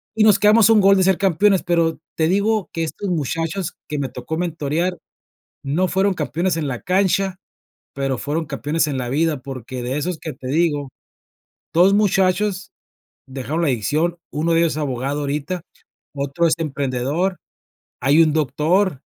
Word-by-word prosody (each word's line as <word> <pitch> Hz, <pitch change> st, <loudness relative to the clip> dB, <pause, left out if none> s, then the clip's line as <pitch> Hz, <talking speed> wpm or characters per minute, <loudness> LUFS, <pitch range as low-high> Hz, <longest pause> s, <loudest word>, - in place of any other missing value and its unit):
y 220 Hz, -, +3 dB
nos 210 Hz, -2 st, +5 dB
quedamos 210 Hz, +1 st, +5 dB
a 225 Hz, -, +7 dB
un 215 Hz, -, +5 dB
gol 195 Hz, 0 st, +6 dB
de 190 Hz, -, +3 dB
ser 190 Hz, -1 st, +3 dB
campeones, 195 Hz, 0 st, +3 dB
pero, 165 Hz, -2 st, +1 dB, 0.2 s
te 160 Hz, 0 st, +1 dB
digo 205 Hz, +2 st, +1 dB
que 165 Hz, -, -2 dB
estos 195 Hz, +5 st, -5 dB
muchachos 165 Hz, +3 st, -2 dB, 0.2 s
que 150 Hz, -1 st, -2 dB
me 135 Hz, -, -1 dB
tocó 160 Hz, -, -5 dB
mentorear, 170 Hz, +1 st, -1 dB, 0.7 s
no 155 Hz, +7 st, 0 dB
fueron 190 Hz, +2 st, +1 dB
campeones 165 Hz, +3 st, -1 dB
en 155 Hz, -3 st, -2 dB
la 125 Hz, -3 st, -4 dB
cancha, 190 Hz, 0 st, +1 dB, 0.6 s
pero 135 Hz, -1 st, -2 dB
fueron 155 Hz, +6 st, -2 dB
campeones 150 Hz, +2 st, -1 dB
en 140 Hz, -, -2 dB
la 125 Hz, -2 st, -3 dB
vida. 150 Hz, +1 st, 0 dB
Porque 130 Hz, -2 st, -7 dB
de 130 Hz, +3 st, -2 dB
esos 170 Hz, +3 st, -2 dB
que 160 Hz, -, -5 dB
te 130 Hz, -, -9 dB
digo, 145 Hz, -1 st, +1 dB, 0.9 s
2 180 Hz, +4 st, +5 dB
muchachos 195 Hz, -1 st, +1 dB, 0.6 s
dejaron 135 Hz, +5 st, -3 dB
la -, -, +2 dB
adicción, 150 Hz, +8 st, 0 dB
1 160 Hz, +3 st, 0 dB
de 165 Hz, -, +4 dB
ellos 165 Hz, -3 st, +2 dB
es -, -, -6 dB
abogado 140 Hz, 0 st, -2 dB
ahorita, 150 Hz, +5 st, -3 dB, 0.5 s
otro 140 Hz, +4 st, 0 dB
es 160 Hz, -, +2 dB
emprendedor, 145 Hz, +4 st, -1 dB, 0.6 s
hay 140 Hz, +5 st, +5 dB
un 155 Hz, -, +1 dB
doctor, 155 Hz, +2 st, +1 dB
165 Hz, 170 wpm, -20 LUFS, 140-185 Hz, 0.9 s, a